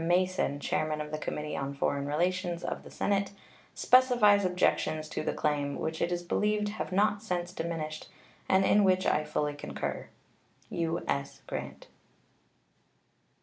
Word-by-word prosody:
Mason, 180 -4 +1
chairman 155 +1 -1
of 150 0 -5
the 155 - -3
Committee 150 0 -4
on 140 +1 -3
Foreign 140 0 -1
Relations 175 +3 0
of - - -3
the - - -11
Senate, 200 -1 0 0.4
specifies 240 -6 +5
objections 180 -4 +1
to - - -3
the - - -1
claim, 145 -2 -1
which 160 0 -3
it 170 - +1
is 175 0 -1
believed 210 +3 +1
have 210 -1 -5
not 205 +2 +2
since 180 -4 -3
diminished, 165 -3 -4 0.4
and 190 0 +4
in 210 - +5
which 185 -1 +3
I 150 - +2
fully 150 -1 -1
concur. 145 - -5 0.6
U.S. 165 -4 -2
GRANT. - - -6
175 Hz, 145 wpm, -30 LUFS, 150-195 Hz, 0.6 s, specifies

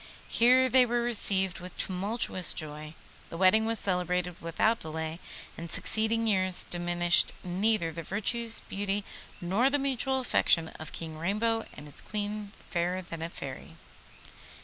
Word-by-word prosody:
Here 255 +2 +5
they 255 0 +5
were 240 0 0
received 195 -6 +1
with 180 0 -10
tumultuous 190 0 -1
joy. 155 0 -5 0.3
The 165 - -7
wedding 195 +5 +4
was 225 0 +1
celebrated 180 -1 -1
without 195 +7 +1
delay, 160 +1 -5 0.4
and 170 0 -8
succeeding 220 +5 +3
years 185 -4 +3
diminished 175 0 +3
neither 185 -1 0
the 165 +1 -6
virtues, 225 +6 +1
beauty, 200 0 -3 0.4
nor 200 +8 +1
the 290 - +1
mutual 270 -1 0
affection 165 -9 +2
of 155 - -7
King 160 -1 -5
Rainbow 225 +6 -1
and 150 - -10
his 145 - 0
Queen, 210 -1 -4 0.2
Fairer 180 +1 -1
than 165 -2 -8
a 165 - -4
Fairy. 135 -5 -9
190 Hz, 145 wpm, -29 LUFS, 170-225 Hz, 0.4 s, Here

